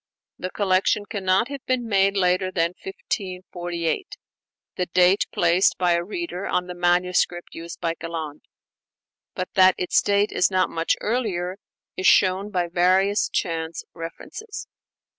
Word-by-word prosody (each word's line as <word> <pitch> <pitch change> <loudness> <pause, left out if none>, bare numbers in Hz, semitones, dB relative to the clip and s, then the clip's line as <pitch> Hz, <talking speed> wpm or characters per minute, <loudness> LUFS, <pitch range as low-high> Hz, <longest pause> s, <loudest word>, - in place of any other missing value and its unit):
The 185 - -3
collection 195 +1 +1
cannot 195 +1 +1
have 280 -2 -7
been 255 -2 0
made 195 -1 +2
later 185 0 +2
than 170 -2 +1
1548, 180 - -4 0.6
the 180 - -1
date 180 +2 +3
placed 175 +2 +3
by 180 -1 +2
a 170 0 +2
reader 210 - -5
on 180 - 0
the 180 - -6
manuscript 175 0 +1
used 165 +1 -8
by 165 - -1
Galland. 160 -3 -6 0.9
But 185 - -4
that 185 -1 +6
its 180 - +2
date 205 +1 +1
is - - +2
not 185 -1 +1
much 165 0 +1
earlier 195 -6 -1 0.4
is 185 - +1
shown 190 +2 +4
by 180 -4 -1
various 185 +4 +2
chance 165 -1 -2
references. 180 - -8
185 Hz, 140 wpm, -23 LUFS, 175-200 Hz, 0.9 s, that